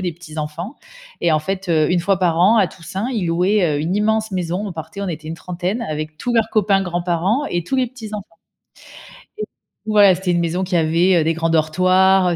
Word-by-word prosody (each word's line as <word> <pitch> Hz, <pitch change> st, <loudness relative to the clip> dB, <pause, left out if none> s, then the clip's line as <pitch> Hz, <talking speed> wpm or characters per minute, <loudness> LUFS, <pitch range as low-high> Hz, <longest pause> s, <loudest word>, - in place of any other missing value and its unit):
des 180 Hz, -2 st, -2 dB
petits 160 Hz, -2 st, -11 dB
enfants 165 Hz, -, -5 dB, 0.4 s
et 170 Hz, -, +2 dB
en 155 Hz, -, +3 dB
fait, 190 Hz, +4 st, -4 dB
heu, 155 Hz, -2 st, +2 dB
1 175 Hz, -, +2 dB
fois 190 Hz, +2 st, +1 dB
par 170 Hz, -3 st, +1 dB
an 205 Hz, +6 st, +5 dB
à 195 Hz, -4 st, +4 dB
Toussaint, 190 Hz, +6 st, -5 dB
ils 205 Hz, -7 st, -1 dB
louaient, 180 Hz, +5 st, +2 dB
heu, -, -, -1 dB
une 160 Hz, +5 st, -1 dB
immense 220 Hz, +1 st, +1 dB
maison, 180 Hz, +2 st, -2 dB
on 195 Hz, -, -5 dB
partait, 160 Hz, +5 st, -7 dB
on 200 Hz, -, -3 dB
était 155 Hz, -2 st, -6 dB
une 160 Hz, -, -4 dB
trentaine 180 Hz, +6 st, -4 dB
avec 155 Hz, -4 st, -5 dB
tous 240 Hz, +9 st, -3 dB
leurs 225 Hz, -2 st, +2 dB
copains, 205 Hz, -3 st, +2 dB
grands-parents 180 Hz, -, 0 dB
et 175 Hz, -1 st, -1 dB
tous 265 Hz, +10 st, -2 dB
les 260 Hz, -1 st, +2 dB
petits 225 Hz, -3 st, -9 dB
enfants 205 Hz, -2 st, -6 dB, 1.1 s
et 430 Hz, -, -3 dB, 0.4 s
ouais, 205 Hz, -3 st, +6 dB
c'était 180 Hz, 0 st, -2 dB
une 175 Hz, -, +1 dB
maison 170 Hz, +2 st, -1 dB
qui 185 Hz, -1 st, -2 dB
avait, 170 Hz, +3 st, +3 dB
heu, -, -, +1 dB
des 165 Hz, +1 st, +1 dB
grands 165 Hz, 0 st, -1 dB
dortoirs, 185 Hz, +4 st, +3 dB
heu, 175 Hz, -, 0 dB
180 Hz, 230 wpm, -19 LUFS, 165-200 Hz, 1.1 s, ouais